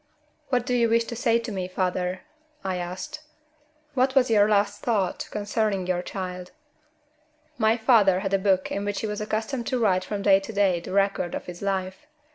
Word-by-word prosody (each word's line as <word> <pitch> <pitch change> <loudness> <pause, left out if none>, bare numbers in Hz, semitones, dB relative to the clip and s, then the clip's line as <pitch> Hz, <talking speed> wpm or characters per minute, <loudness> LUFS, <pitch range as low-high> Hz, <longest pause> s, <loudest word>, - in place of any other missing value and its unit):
"What 250 -2 +1
do 250 - -1
you 235 -2 +3
wish 230 +1 +3
to 235 +1 -6
say 230 -1 +2
to 230 0 -5
me, 185 -3 -3
father?" 185 0 -2 0.4
I 190 -1 -2
asked. 180 +9 -5 0.7
"What 260 0 +1
was 255 -3 +4
your 210 -1 +5
last 205 -1 +1
thought 205 -6 -1
concerning 205 -2 -1
your 180 -1 0
child?" 180 -1 -6 1.1
My 220 +1 +3
father 215 -6 +4
had 195 -1 -3
a 195 - +3
book 190 -1 +1
in 200 - -2
which 205 0 -2
he - - -2
was 210 0 -3
accustomed 220 +3 -2
to 255 - 0
write 185 -5 +2
from 200 0 -4
day 195 -1 +6
to 195 +3 -8
day 200 -4 +2
the 170 - -9
record 195 -2 +1
of - - -5
his 180 -1 -9
life. 190 +4 -3
200 Hz, 195 wpm, -25 LUFS, 185-225 Hz, 1.1 s, day